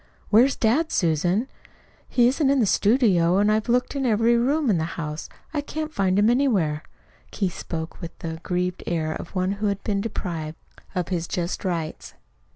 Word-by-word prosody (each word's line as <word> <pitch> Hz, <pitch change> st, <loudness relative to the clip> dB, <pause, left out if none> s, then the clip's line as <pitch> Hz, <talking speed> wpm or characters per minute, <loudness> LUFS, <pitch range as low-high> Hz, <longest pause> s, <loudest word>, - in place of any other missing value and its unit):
"Where's 245 Hz, +6 st, +5 dB
dad, 275 Hz, +9 st, +1 dB
Susan? 175 Hz, -, +1 dB, 0.6 s
He 240 Hz, -1 st, +4 dB
isn't 270 Hz, +2 st, +2 dB
in 275 Hz, 0 st, +3 dB
the 230 Hz, -, +4 dB
studio 195 Hz, -5 st, +3 dB
and 205 Hz, +1 st, +3 dB
I've 215 Hz, +2 st, 0 dB
looked 250 Hz, +3 st, +1 dB
in 275 Hz, -, -1 dB
every 230 Hz, 0 st, +3 dB
room 275 Hz, +5 st, +2 dB
in 175 Hz, -, +2 dB
the -, -, 0 dB
house 150 Hz, -1 st, -4 dB, 0.3 s
and 300 Hz, -, 0 dB
I -, -, 0 dB
can't 310 Hz, +1 st, -5 dB
find 190 Hz, -1 st, +1 dB
him 205 Hz, +1 st, +4 dB
anywhere." 215 Hz, -, +2 dB, 0.5 s
Keith 190 Hz, -4 st, -2 dB
spoke 160 Hz, +1 st, -6 dB
with 170 Hz, -1 st, -8 dB
the 160 Hz, -1 st, -5 dB
aggrieved 180 Hz, +2 st, -2 dB
air 160 Hz, -2 st, -1 dB
of 170 Hz, -, -8 dB
one 185 Hz, +1 st, +1 dB
who 205 Hz, +1 st, -1 dB
has 200 Hz, -1 st, 0 dB
been 200 Hz, -2 st, 0 dB
deprived 170 Hz, -7 st, -4 dB, 0.4 s
of 180 Hz, -2 st, -1 dB
his 175 Hz, -3 st, -2 dB
just 175 Hz, +2 st, -3 dB
rights. 170 Hz, -4 st, -4 dB
200 Hz, 185 wpm, -24 LUFS, 170-240 Hz, 0.6 s, Where's